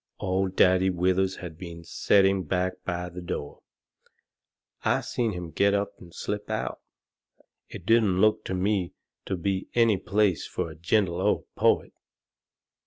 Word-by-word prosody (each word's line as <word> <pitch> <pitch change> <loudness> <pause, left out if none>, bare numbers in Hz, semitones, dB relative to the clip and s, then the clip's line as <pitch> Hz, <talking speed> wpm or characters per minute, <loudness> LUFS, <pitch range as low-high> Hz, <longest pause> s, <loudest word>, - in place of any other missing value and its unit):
Old 95 0 -1
Daddy 95 +1 +4
Withers 95 +1 +1
had 80 -3 -9
been 85 -2 -8
setting 95 +2 +3
back 90 +1 -2
by 90 -1 -3
the 90 +1 -8
door. 75 -4 -5 1.2
I - - +2
seen 115 -3 -1
him 90 -2 -6
get 100 +3 +3
up 100 0 -1
and 85 - -13
slip 105 +4 -4
out. - - -3 0.9
It 90 - -9
didn't 110 -4 +3
look 110 +1 +3
to 95 - -2
me 95 -1 0 0.3
to 95 - -1
be 95 +2 -2
any 115 -4 +4
place 95 -2 +1
fur 80 - -3
a - - -11
gentle 85 +1 +1
old - - +1
poet. - - +2
95 Hz, 150 wpm, -27 LUFS, 90-100 Hz, 1.2 s, Daddy